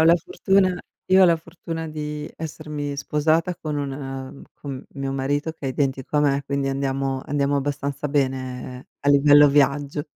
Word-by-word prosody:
ho -, -, +6 dB
la 170 Hz, +1 st, +7 dB
fortuna 185 Hz, +2 st, +1 dB, 0.3 s
io 190 Hz, 0 st, +7 dB
ho -, -, +9 dB
la 170 Hz, -2 st, +5 dB
fortuna 165 Hz, 0 st, -7 dB
di 150 Hz, -1 st, -5 dB
essermi 150 Hz, -2 st, -5 dB
sposata 160 Hz, +5 st, +1 dB
con 155 Hz, -3 st, -4 dB
un 140 Hz, -1 st, -2 dB
mhmm, 135 Hz, -1 st, -7 dB
con 135 Hz, -2 st, -7 dB
mio 135 Hz, -1 st, -3 dB
marito 145 Hz, +4 st, -1 dB
che 145 Hz, -4 st, -7 dB
è -, -, 0 dB
identico 135 Hz, +1 st, -1 dB
a -, -, +5 dB
me, 140 Hz, -1 st, +2 dB
quindi 140 Hz, 0 st, -1 dB
andiamo 135 Hz, 0 st, -1 dB
andiamo 140 Hz, 0 st, 0 dB
abbastanza 140 Hz, +1 st, -2 dB
bene 130 Hz, -2 st, -2 dB
a 145 Hz, -, -1 dB
livello 145 Hz, +1 st, +7 dB
viaggio. 145 Hz, +1 st, +2 dB
145 Hz, 170 wpm, -23 LUFS, 135-155 Hz, 0.3 s, ho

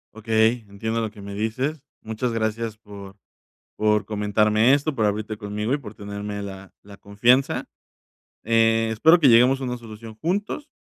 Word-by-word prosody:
Okey, 110 Hz, +1 st, +1 dB
entiendo 110 Hz, +3 st, -3 dB
lo 110 Hz, -1 st, -2 dB
que 105 Hz, -1 st, -14 dB
me 100 Hz, 0 st, -8 dB
dices. 125 Hz, +8 st, -2 dB, 0.2 s
Muchas 110 Hz, +2 st, -3 dB
gracias 110 Hz, 0 st, -2 dB
por 100 Hz, -2 st, -12 dB, 0.6 s
por 105 Hz, 0 st, +2 dB
comentarme 105 Hz, +3 st, +2 dB
esto, 145 Hz, +1 st, +1 dB
por 110 Hz, -, +1 dB
abrirte 105 Hz, +1 st, -2 dB
conmigo 105 Hz, +2 st, -4 dB
y -, -, +2 dB
por 110 Hz, -7 st, -10 dB
tenerme 100 Hz, 0 st, -6 dB
la 95 Hz, -1 st, -9 dB
la 100 Hz, 0 st, -14 dB
confianza. 120 Hz, +7 st, +1 dB, 0.8 s
Eh, 115 Hz, 0 st, +3 dB
espero 160 Hz, +10 st, +5 dB
que 150 Hz, -, +5 dB
lleguemos 125 Hz, +3 st, +5 dB
a -, -, -6 dB
una 125 Hz, 0 st, -3 dB
solución 110 Hz, -1 st, -11 dB
juntos. 205 Hz, -, -2 dB
110 Hz, 160 wpm, -23 LUFS, 105-120 Hz, 0.8 s, espero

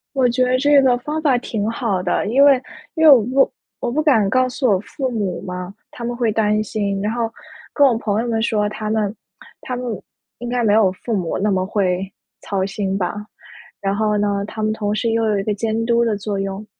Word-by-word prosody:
我 260 Hz, -2 st, +3 dB
觉 250 Hz, +1 st, +1 dB
得 255 Hz, 0 st, +2 dB
这 285 Hz, +1 st, +5 dB
个 250 Hz, -2 st, +3 dB
方 300 Hz, +5 st, -4 dB
法 275 Hz, -5 st, +3 dB
挺 220 Hz, -3 st, -3 dB
好 215 Hz, -5 st, -1 dB
的， 175 Hz, -, 0 dB
因 265 Hz, +6 st, +4 dB
为 275 Hz, -3 st, +6 dB, 0.3 s
因 320 Hz, -, 0 dB
为 310 Hz, -, +9 dB
我 260 Hz, -5 st, +8 dB
不 260 Hz, +5 st, +2 dB, 0.3 s
我 240 Hz, -, -2 dB
不 300 Hz, +5 st, +1 dB
敢 225 Hz, -10 st, +3 dB
告 255 Hz, +3 st, +2 dB
诉 255 Hz, 0 st, 0 dB
我 200 Hz, -, +4 dB
父 255 Hz, +6 st, -4 dB
母 205 Hz, -7 st, -3 dB
嘛， 180 Hz, 0 st, -6 dB, 0.2 s
他 235 Hz, -, -10 dB
们 240 Hz, +1 st, -3 dB
会 235 Hz, -3 st, 0 dB
担 210 Hz, -1 st, +1 dB
心， 200 Hz, -2 st, -2 dB
然 210 Hz, +2 st, -1 dB
后 230 Hz, -1 st, -2 dB, 0.4 s
跟 285 Hz, -2 st, +5 dB
我 235 Hz, -, +2 dB
朋 215 Hz, -1 st, -1 dB
友 240 Hz, -, -3 dB
们 225 Hz, -1 st, 0 dB
说， 210 Hz, -2 st, +1 dB
他 215 Hz, 0 st, -5 dB
们 215 Hz, -2 st, 0 dB, 0.5 s
他 250 Hz, -, -4 dB
们 250 Hz, 0 st, -5 dB, 0.5 s
应 240 Hz, +1 st, -5 dB
该 245 Hz, 0 st, 0 dB
没 210 Hz, -2 st, +3 dB
有 210 Hz, -3 st, +4 dB
父 215 Hz, +4 st, -4 dB
母 175 Hz, -4 st, -2 dB
那 210 Hz, +2 st, 0 dB
么 185 Hz, -2 st, +1 dB
会 190 Hz, -1 st, -1 dB, 0.3 s
操 190 Hz, -2 st, -2 dB
心 195 Hz, -1 st, -2 dB
吧， 185 Hz, +1 st, -2 dB, 0.6 s
然 200 Hz, -1 st, -1 dB
后 210 Hz, 0 st, +1 dB
呢， 205 Hz, -1 st, 0 dB
他 215 Hz, -, -6 dB
们 215 Hz, 0 st, +1 dB
同 210 Hz, -1 st, -2 dB
时 225 Hz, +2 st, 0 dB
又 225 Hz, 0 st, +1 dB
有 205 Hz, -2 st, +1 dB
一 -, -, -2 dB
个 210 Hz, -, -1 dB
监 225 Hz, +2 st, -2 dB
督 235 Hz, 0 st, +3 dB
的 225 Hz, -3 st, 0 dB
作 200 Hz, 0 st, -3 dB
用， 195 Hz, +2 st, -4 dB
220 Hz, 250 characters per minute, -20 LUFS, 200-245 Hz, 0.6 s, 为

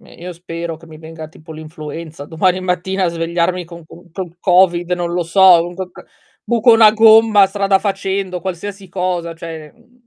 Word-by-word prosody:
ehm, -, -, -18 dB
io 180 Hz, +1 st, -8 dB
spero 170 Hz, -1 st, -7 dB
che 165 Hz, +1 st, -17 dB
mi 155 Hz, -1 st, -13 dB
venga 160 Hz, -1 st, -10 dB
tipo 160 Hz, 0 st, -14 dB
l'influenza 155 Hz, -1 st, -9 dB
domani 180 Hz, +4 st, 0 dB
mattina 185 Hz, +1 st, -2 dB
a 175 Hz, -, +1 dB
svegliarmi 170 Hz, +2 st, -2 dB
con 170 Hz, 0 st, -13 dB
con 175 Hz, +1 st, -16 dB
col 175 Hz, -1 st, -8 dB
Covid, 175 Hz, -1 st, +2 dB
non 175 Hz, -1 st, -4 dB
lo 175 Hz, 0 st, -1 dB
so, 180 Hz, 0 st, +5 dB, 0.2 s
con 185 Hz, -1 st, -7 dB
co -, -, -13 dB, 0.4 s
buco 235 Hz, 0 st, +3 dB
una 220 Hz, -1 st, +7 dB
gomma 220 Hz, -2 st, +5 dB
strada 195 Hz, 0 st, +1 dB
facendo, 195 Hz, -2 st, -3 dB
qualsiasi 190 Hz, +2 st, -7 dB
cosa, 180 Hz, -2 st, -3 dB
cioè, 165 Hz, -2 st, -9 dB
mhmm 240 Hz, 0 st, -29 dB
180 Hz, 180 wpm, -16 LUFS, 165-195 Hz, 0.4 s, una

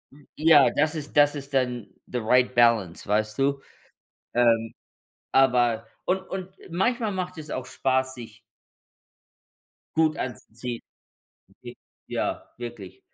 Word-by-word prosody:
m 145 Hz, -1 st, -20 dB
ja, 155 Hz, -3 st, +6 dB
das 155 Hz, +2 st, +2 dB
ist 150 Hz, -2 st, -7 dB
das 145 Hz, 0 st, +6 dB
ist 140 Hz, -1 st, -7 dB
dann 125 Hz, -5 st, 0 dB, 0.2 s
the 125 Hz, -, -3 dB
right 125 Hz, +3 st, +3 dB
balance, 115 Hz, -7 st, +3 dB
weißt 110 Hz, +1 st, 0 dB
du? 140 Hz, 0 st, +1 dB, 0.7 s
Ähm, 115 Hz, -2 st, +3 dB, 0.6 s
aber 120 Hz, -4 st, +3 dB, 0.2 s
und 190 Hz, +1 st, +1 dB
und 190 Hz, -1 st, -5 dB, 0.2 s
manchmal 220 Hz, +5 st, 0 dB
macht 180 Hz, -2 st, -4 dB
es 155 Hz, -1 st, -8 dB
auch 130 Hz, -, -3 dB
spaß, 130 Hz, 0 st, 0 dB
sich 115 Hz, -2 st, -11 dB, 1.6 s
Gut 160 Hz, -1 st, +3 dB
anzuziehen. 120 Hz, -1 st, -6 dB, 0.7 s
Okay, -, -, -12 dB, 0.3 s
ja, -, -, -3 dB
wirklich. 115 Hz, -6 st, -8 dB
130 Hz, 125 wpm, -26 LUFS, 120-150 Hz, 1.6 s, ja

